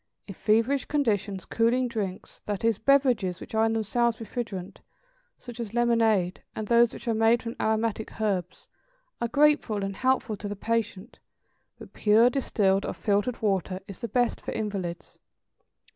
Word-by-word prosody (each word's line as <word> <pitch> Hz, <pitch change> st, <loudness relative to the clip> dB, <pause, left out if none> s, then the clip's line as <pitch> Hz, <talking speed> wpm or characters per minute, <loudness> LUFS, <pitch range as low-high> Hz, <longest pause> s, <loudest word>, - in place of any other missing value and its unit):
= -, -, -46 dB
In 200 Hz, -, -7 dB
feverish 230 Hz, +8 st, +1 dB
conditions 205 Hz, -9 st, -1 dB
cooling 240 Hz, +3 st, +1 dB
drinks, 205 Hz, -5 st, -5 dB
that 205 Hz, 0 st, -3 dB
is 225 Hz, -3 st, +2 dB
beverages 240 Hz, -9 st, +2 dB
which -, -, -11 dB
are 220 Hz, 0 st, +3 dB
in 225 Hz, -, +1 dB
themselves 225 Hz, +1 st, 0 dB
refrigerant, 220 Hz, -5 st, -6 dB, 0.6 s
such 240 Hz, -2 st, -11 dB
as 230 Hz, -1 st, -5 dB
lemonade, 225 Hz, -6 st, +2 dB
and 220 Hz, -, -3 dB
those 235 Hz, 0 st, +5 dB
which -, -, -11 dB
are 230 Hz, -, +2 dB
made 225 Hz, +2 st, +3 dB
from 230 Hz, 0 st, -5 dB
aromatic 220 Hz, 0 st, -1 dB
herbs, 185 Hz, -4 st, -2 dB, 0.5 s
are 235 Hz, -, +1 dB
grateful 280 Hz, -6 st, +2 dB
and 195 Hz, -1 st, -4 dB
helpful 260 Hz, -4 st, +1 dB
to 205 Hz, -, -6 dB
the 205 Hz, -, -4 dB
patient, 225 Hz, 0 st, -3 dB, 0.6 s
but -, -, -13 dB
pure, 225 Hz, +3 st, +4 dB
distilled 200 Hz, -7 st, +1 dB
or -, -, -3 dB
filtered 210 Hz, +3 st, -1 dB
water, 190 Hz, -2 st, 0 dB
is 195 Hz, -, -9 dB
the 235 Hz, -, -4 dB
best 245 Hz, +2 st, 0 dB
for -, -, -5 dB
invalids. 195 Hz, -5 st, -5 dB
220 Hz, 160 wpm, -27 LUFS, 200-235 Hz, 0.6 s, those